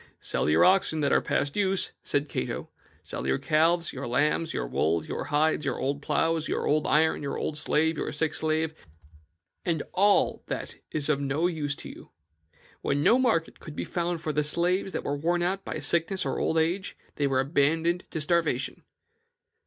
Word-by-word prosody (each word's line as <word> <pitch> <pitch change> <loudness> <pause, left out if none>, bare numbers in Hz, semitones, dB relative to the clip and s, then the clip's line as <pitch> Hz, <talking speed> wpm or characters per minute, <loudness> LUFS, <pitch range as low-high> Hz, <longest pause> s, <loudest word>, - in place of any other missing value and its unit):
'Sell - - -1
your 80 +2 +5
oxen 185 -4 +3
that 140 - +1
are - - +4
past 145 0 -1
use,' 195 -2 +1
said 145 +1 0
Cato, 65 - -4 0.3
'sell 65 - -5
your 65 - +2
calves, 165 +2 +2
your 135 -1 -5
lambs, 150 +6 +1
your - - -2
wool, 80 +6 0
your - - -4
hides, 150 +1 +1
your 135 -3 -1
old 140 +2 -2
ploughs, 155 +2 0
your - - -1
old 150 +1 +2
iron, 160 +1 +3
your 140 -1 -3
old 155 - -2
slave, 155 +1 +1
and - - -2
your - - -3
sick 155 +1 -1
slave, 160 0 0 0.9
and 165 -4 -1
all 200 +2 +3
that - - -5
is 150 -2 -2
of 145 -2 +1
no 140 +4 0
use 150 -5 -1
to - - -10
you.' - - -12 0.7
When 145 +1 0
no 245 - +5
market 220 -11 +1
could 155 - -10
be - - -3
found 175 -2 -2
for 155 - -2
the 150 +1 +1
slaves 175 +5 +1
that - - -3
were 145 - -1
worn 170 +4 0
out 190 +2 -1
by - - -4
sickness 170 +3 +1
or - - -1
old 160 - 0
age, 175 +5 0 0.2
they 145 - +2
were 135 -1 +1
abandoned 160 +5 +1
to 160 - -4
starvation. 155 -4 0
155 Hz, 190 wpm, -27 LUFS, 145-170 Hz, 0.9 s, your